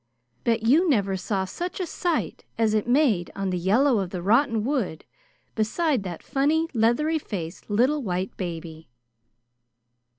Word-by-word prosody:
Bet 230 -1 +1
you 310 +10 +4
never 200 -8 +2
saw 190 +1 -2
such 350 - -5
a 370 - -1
sight 345 0 -2
as 225 -2 +2
it 215 +1 0
made 245 - +3
on 195 -1 -2
the 180 - -1
yellow 230 +7 +3
of 190 -2 -2
the 180 -1 -5
rotten 230 +2 +3
wood 235 - -2 0.5
beside 255 +5 0
that 180 -4 -7
funny 305 +4 +1
leathery 265 +8 +2
faced 175 - -6
little 255 +8 +2
white 185 -4 -3
baby." 165 -4 -6
220 Hz, 145 wpm, -25 LUFS, 190-285 Hz, 0.5 s, you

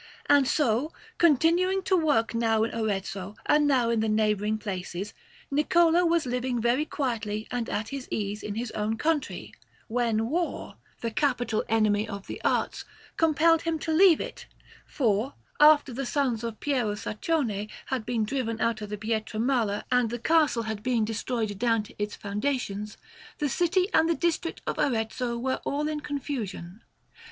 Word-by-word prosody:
And 285 -2 +5
so, 275 +2 +1 0.3
continuing 345 +5 +3
to 375 - +2
work 290 -10 +2
now 225 -1 +2
in 225 - -2
Arezzo, 200 -2 -3
and 295 0 +4
now 250 -5 +3
in 230 - +1
the 220 0 0
neighbouring 215 0 +1
places, 190 -1 -5 0.4
Niccolò 335 +3 +4
was 335 -3 +2
living 250 0 -1
very 240 +6 +2
quietly 220 -8 -3
and 245 -2 -2
at 215 +1 -2
his 275 -2 -6
ease 205 0 -3
in 205 - -5
his 230 +1 -3
own 215 +1 -2
country, 310 -1 -2 0.3
when 225 -2 0
war, 335 +6 -3 0.2
the 230 - -2
capital 245 -4 0
enemy 215 -1 +2
of 200 -1 -6
the - - -7
arts, - - 0 0.3
compelled 325 +1 +4
him 330 -1 -1
to 320 +1 -2
leave 350 -1 +6
it, - - -7 0.4
for, 230 0 0 0.2
after 295 -3 +6
the 265 +1 -3
sons 250 -6 0
of 230 -2 -5
Piero 250 -8 0
Saccone 215 -1 -2 0.2
had 260 -4 -2
been 235 -1 -1
driven 230 -1 -2
out 230 -1 0
of 210 - -6
Pietramala 220 +1 -1
and 250 -2 +3
the 240 - -3
castle 295 -3 +2
had 220 -2 -4
been 235 -1 +1
destroyed 220 -2 -3
down 230 -2 +2
to - - -14
its 205 0 -2
foundations, 210 -1 -3 0.4
the 295 - 0
city 360 +5 +2
and 320 +1 +4
the 335 - +2
district 335 0 -1
of - - -3
Arezzo 235 -1 -1
were 260 +2 -2
all 295 +2 -1
in 305 -1 -2
confusion. 235 - -5
235 Hz, 165 wpm, -27 LUFS, 215-295 Hz, 0.4 s, leave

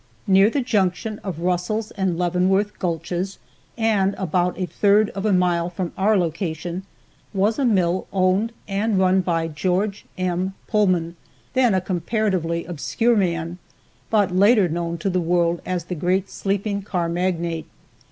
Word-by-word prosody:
Near 195 +1 +5
the 275 +4 0
junction 210 -2 0
of 175 -5 -6
Russell's 180 +5 -1
and 190 -4 -1
Leavenworth 185 +4 +1
gulches, 175 +2 -2 0.4
and 210 -4 +2
about 180 0 0
a 185 - -1
third 205 +3 +3
of 195 +2 -3
a - - +2
mile 175 -2 +2
from 180 -1 -4
our 210 +2 +3
location, 175 +1 -3 0.5
was 205 +6 +1
a 275 - +2
mill 185 -5 +1
owned 190 +4 +2 0.2
and 205 +1 0
run 185 0 +4
by 165 -2 0
George 185 +6 -1
M. 185 +1 -1
Pullman, 180 -6 +1 0.4
then 250 -5 +3
a 185 - +2
comparatively 180 -2 -1
obscure 225 +8 0
man, 170 -3 -1 0.5
but 205 -4 +2
later 200 +1 +5
known 170 +1 -3
to 180 +5 -1
the 180 0 +1
world 170 0 +1
as 180 -2 -1
the 180 - -5
great 180 +4 0
sleeping 200 +1 -2
car 180 -4 -2
magnate. 170 -1 -2
185 Hz, 150 wpm, -22 LUFS, 175-200 Hz, 0.5 s, Near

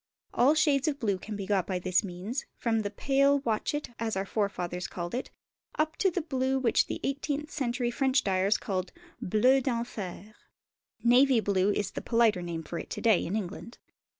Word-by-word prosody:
All 270 +6 +4
shades 295 -2 +3
of 290 -2 0
blue 200 -6 0
can 215 +3 -6
be 200 -1 -4
got 190 -3 +1
by 185 - -1
this 180 +2 +1
means, 200 +8 -5
from 230 -2 0
the 205 -2 -2
pale 275 +6 +3
"watchet," 245 +4 -2
as 225 -2 -1
our 195 +1 -1
forefathers 180 -4 -2
called 175 -2 -6
it, 250 - -3 0.5
up 310 +1 0
to 390 - +3
the 355 -1 -2
blue 265 -3 0
which 250 -4 +2
the - - -4
eighteenth 285 +2 -2
century 245 -3 -1
French 265 +1 +2
dyers 195 +1 +2
called 185 -2 -3 0.3
"Bleu 250 +7 +3
d'enfer." 220 -5 -4 0.7
Navy 250 +1 +5
Blue 200 -2 +1
is 205 -1 -1
the - - -5
politer 230 -5 +2
name 170 -2 -4
for 170 - -5
it - - -8
to - - -5
day 220 -6 +4
in 180 - -3
England. 215 +3 -5
225 Hz, 185 wpm, -29 LUFS, 195-270 Hz, 0.7 s, Navy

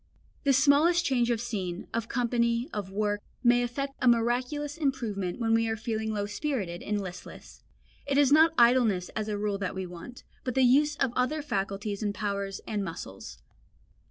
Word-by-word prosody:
The 275 - +5
smallest 300 +6 +4
change 245 -3 +2
of 235 -2 +1
scene, 195 -6 -4
of 230 0 -2
company, 235 0 +1
of 200 -2 -4
work 205 +1 -1 0.2
may 245 0 +5
effect 275 +3 -3
a 255 - +2
miraculous 250 +5 +1
improvement 235 - -2
when 225 -1 +1
we 225 0 +3
are 225 - -1
feeling 220 -1 -2
low 205 -1 -1
spirited 205 - -3
and 210 0 -2
listless. 180 -2 -9 0.5
It 280 0 +1
is 285 -2 +4
not 320 +2 +6
idleness 235 -6 +4
as 215 -1 -4
a 210 -1 -2
rule 205 -1 -1
that 195 -2 -3
we 190 0 -3
want, 180 +8 -10 0.2
but 255 - -3
the 265 - +4
use 290 +4 +4
of 265 -4 0
other 290 +5 0
faculties 200 -4 -3
and 205 -1 -1
powers 200 -2 -3
and 210 -2 -2
muscles. 95 - -8
230 Hz, 180 wpm, -28 LUFS, 205-260 Hz, 0.5 s, not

